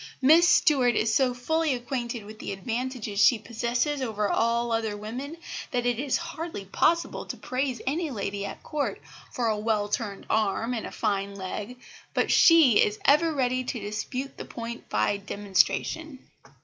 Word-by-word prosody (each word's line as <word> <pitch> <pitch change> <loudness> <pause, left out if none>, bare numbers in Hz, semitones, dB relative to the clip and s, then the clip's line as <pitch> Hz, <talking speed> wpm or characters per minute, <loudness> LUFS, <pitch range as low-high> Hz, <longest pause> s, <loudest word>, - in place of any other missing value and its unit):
Miss 320 +6 +6
Stuart 255 -6 +4
is 220 0 +1
so 260 +1 +3
fully 315 +3 0
acquainted 240 -2 -4
with 215 +1 -11
the - - -5
advantages 230 +1 -3
she 245 - +6
possesses 235 +6 -1
over 215 -4 -1
all 235 +1 +1
other 220 -2 -1
women, 250 +9 -6 0.3
that 245 -1 -1
it 245 -1 +1
is 280 -1 +1
hardly 330 - -6
possible 335 - +1
to - - -5
praise 255 -1 -2
any 310 +4 -1
lady 200 -4 -3
at 200 - -7
Court 295 -2 -2 0.3
for 245 - -2
a 215 -1 0
well 210 -1 0
turned 205 -2 -3
arm 220 +2 0
and 230 - -3
a - - -9
fine 200 -2 -1
leg, 200 +5 -6 0.4
but - - +1
she 315 -10 +7
is 210 0 -1
ever 310 +4 +5
ready 255 -3 0
to 245 -1 -4
dispute 215 +6 -5
the - - -6
point 235 0 -7
by 205 - +1
demonstration. 205 +9 0
240 Hz, 165 wpm, -27 LUFS, 210-270 Hz, 0.4 s, she